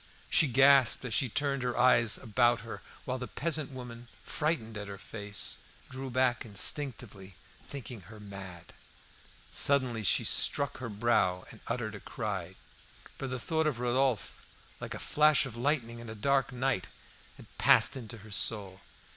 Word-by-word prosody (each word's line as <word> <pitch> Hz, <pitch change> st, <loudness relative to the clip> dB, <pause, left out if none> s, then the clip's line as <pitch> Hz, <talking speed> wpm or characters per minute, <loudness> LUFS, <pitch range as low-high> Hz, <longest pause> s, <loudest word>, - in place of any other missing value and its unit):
She 155 Hz, -, +5 dB
gasped 135 Hz, 0 st, +5 dB
as 120 Hz, -, -3 dB
she 125 Hz, +3 st, +3 dB
turned 140 Hz, +3 st, 0 dB
her 125 Hz, -1 st, -2 dB
eyes 115 Hz, -3 st, +4 dB
about 120 Hz, 0 st, +2 dB
her, 115 Hz, 0 st, -8 dB, 0.2 s
while 130 Hz, 0 st, -3 dB
the 125 Hz, -, -5 dB
peasant 155 Hz, -2 st, -1 dB
woman, 120 Hz, -3 st, -9 dB, 0.2 s
frightened 150 Hz, -8 st, -1 dB
at 105 Hz, -1 st, -5 dB
her 100 Hz, 0 st, -7 dB
face, 105 Hz, 0 st, -3 dB, 0.3 s
drew 130 Hz, +1 st, -5 dB
back 125 Hz, -1 st, +1 dB
instinctively, 110 Hz, -, -1 dB, 0.3 s
thinking 125 Hz, -5 st, -8 dB
her 110 Hz, -1 st, -11 dB
mad. 95 Hz, -4 st, -10 dB, 0.8 s
Suddenly 130 Hz, -5 st, +2 dB
she -, -, +3 dB
struck 140 Hz, 0 st, +1 dB
her 130 Hz, -2 st, -5 dB
brow 100 Hz, -4 st, +1 dB
and -, -, -12 dB
uttered 115 Hz, -4 st, -3 dB
a 105 Hz, -, -7 dB
cry; 100 Hz, -7 st, -5 dB, 0.6 s
for 135 Hz, -, -3 dB
the 130 Hz, -1 st, -4 dB
thought 160 Hz, +4 st, 0 dB
of 145 Hz, -6 st, -1 dB
Rodolphe, 125 Hz, -1 st, 0 dB, 0.4 s
like -, -, -6 dB
a -, -, -5 dB
flash 150 Hz, -1 st, +3 dB
of 125 Hz, -4 st, -7 dB
lightning 120 Hz, -2 st, -1 dB
in 120 Hz, -1 st, -9 dB
a 110 Hz, -, -7 dB
dark 135 Hz, +4 st, +1 dB
night, 125 Hz, -4 st, -1 dB, 0.5 s
had -, -, -16 dB
passed -, -, +5 dB
into 120 Hz, -3 st, -7 dB
her 110 Hz, -, -13 dB
soul. 100 Hz, -2 st, 0 dB
120 Hz, 160 wpm, -30 LUFS, 105-135 Hz, 0.8 s, She